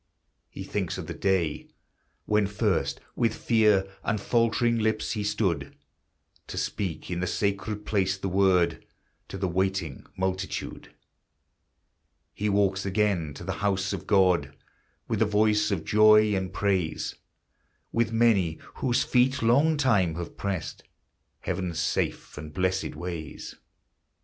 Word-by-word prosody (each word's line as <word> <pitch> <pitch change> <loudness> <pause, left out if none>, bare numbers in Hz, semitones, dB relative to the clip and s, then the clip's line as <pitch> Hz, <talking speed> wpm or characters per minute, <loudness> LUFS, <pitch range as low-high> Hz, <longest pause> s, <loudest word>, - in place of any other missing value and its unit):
He - - -8
thinks - - -3
of - - -5
the - - -5
day 95 -6 0 0.6
when 105 -1 +2
first, 95 -10 0 0.2
with 115 -1 +1
fear 105 -4 +3 0.2
And 110 -2 0
faltering 115 +2 +2
lips, 110 0 0
he 105 -3 -2
stood 95 -9 -1 0.7
To - - -7
speak 90 -4 -3
in 85 - -2
the 90 - -1
sacred 105 +2 -2
place 95 -3 +1
the 95 - -4
Word 95 -2 +2 0.4
To - - -7
the 95 0 -1
waiting 95 -5 -2
multitude; 95 0 -3 1.4
He 105 +1 -1
walks 100 -1 +2
again 95 -7 0
to - - -9
the 95 +2 -3
house 95 -1 0
of 95 - -6
God 90 -8 +3 0.5
With - - -1
the 110 - +4
voice 105 0 +2
of 95 -6 -2
joy 105 0 +6
and 95 -1 -2
praise, 95 -6 -1 0.8
With 115 -1 +1
many 110 -8 +3 0.2
whose 130 -1 +1
feet 130 +1 +2
long 145 +7 +4
time 105 - +2
have 85 0 -6
pressed 95 -6 -4 0.6
Heaven's 90 -2 -3
safe 85 -3 -2
and 75 0 -8
blessèd 95 +1 -1
ways. 85 -4 -6
95 Hz, 135 wpm, -27 LUFS, 90-105 Hz, 1.4 s, joy